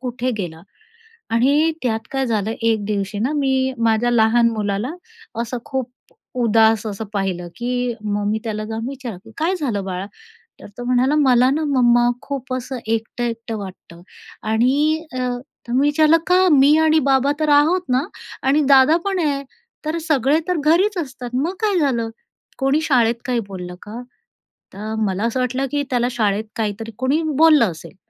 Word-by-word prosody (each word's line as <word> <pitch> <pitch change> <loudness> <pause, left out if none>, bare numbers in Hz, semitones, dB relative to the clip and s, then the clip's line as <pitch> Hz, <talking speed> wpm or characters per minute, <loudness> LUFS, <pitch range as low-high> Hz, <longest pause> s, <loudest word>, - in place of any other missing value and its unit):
कुठे 250 0 -3
गेला. 170 -4 -5 0.7
आणि 285 +7 +3
त्यात 225 -3 0
काय 270 0 0
झालं 220 -2 -1
एक 225 -2 +1
दिवशी 200 -1 -2
ना, 245 +7 0
मी 265 -2 +1
माझ्या 230 +1 +2
लहान 230 0 +4
मुलाला 210 +3 -2 0.5
असं 240 +1 -4
खूप 260 -2 -3 0.5
उदास 225 0 +3
असं 210 +1 -5
पाहिलं, 190 -3 -2
की 245 0 -2
मग 205 -1 -2
मी 220 - 0
त्याला 215 -1 -3
जाऊन 225 +2 -4
विचारलं, 230 -7 -8
"काय 340 +4 0
झालं 245 - -2
बाळा?" 185 0 -4 0.6
तर - - -10
तो 245 - -6
म्हणाला, 255 +4 +2
"मला 255 -4 +4
ना 310 +3 0
मम्मा 240 -3 +3
खूप 270 -2 -5
असं 255 +1 -4
एकटं-एकटं 225 0 -3
वाटतं" 185 -3 -10 0.5
आणि 285 +8 +2
अ, 255 - -4 0.5
तर 240 - -4
मी 260 - +3
विचारलं, 310 +2 +4
"का? 370 +1 +4
मी 285 +1 +6
आणि 315 0 +4
बाबा 270 +1 +3
तर 310 -1 +1
आहोत 300 +5 +4
ना 255 +2 +2 0.4
आणि 285 +3 +4
दादा 275 +4 +6
पण 390 -2 0
आहे, 280 -1 -1 0.4
तर 310 +2 -1
सगळे 280 0 +3
तर 360 -2 0
घरीच 375 +6 +3
असतात. 260 -6 -5
मग 295 +8 0
काय 410 -5 +2
झालं? 235 -6 0 0.5
कोणी 275 +3 +1
शाळेत 240 -6 +2
काही 245 -2 0
बोललं 180 -2 -7
का?" 225 +4 -8 0.7
तर 215 +3 -5
मला 195 +1 -2
असं 235 +2 -1
वाटलं 255 +2 -1
की 290 0 0
त्याला 245 -1 +1
शाळेत 215 -3 0
काहीतरी 220 0 -3
कोणी 265 +6 +1 0.2
बोललं 305 - +5
असेल. 165 +4 -12
245 Hz, 165 wpm, -20 LUFS, 220-280 Hz, 0.7 s, मी